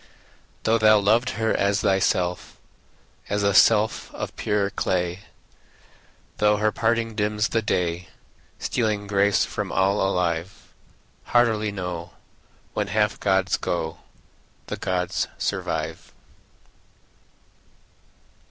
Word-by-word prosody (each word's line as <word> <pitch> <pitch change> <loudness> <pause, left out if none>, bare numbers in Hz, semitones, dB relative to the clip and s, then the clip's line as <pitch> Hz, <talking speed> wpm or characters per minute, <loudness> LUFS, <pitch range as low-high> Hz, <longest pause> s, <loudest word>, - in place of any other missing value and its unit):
Though 115 +1 +2
thou 110 0 +6
loved 110 +4 +2
her 110 -1 +1
as 100 0 +1
thyself, 90 -2 0 0.7
As 105 0 0
a 100 0 +2
self 110 +2 +4
of - - -5
purer 100 -1 0
clay, 90 -1 -1 1.2
Though 105 0 +3
her 110 +1 +1
parting 115 +1 0
dims 105 +1 0
the 115 - +1
day, 90 -4 -1 0.5
Stealing 110 -4 -1
grace 100 0 +2
from - - -4
all 100 +2 +2
alive; 90 -1 -2 0.5
Heartily 110 -3 +2
know, 90 -3 -5 0.6
When - - -1
half 105 -1 0
gods 95 -1 +1
go, 80 -2 -3 0.7
The - - -5
gods 90 -1 -1
survive. - - -3
100 Hz, 105 wpm, -24 LUFS, 90-110 Hz, 1.2 s, thou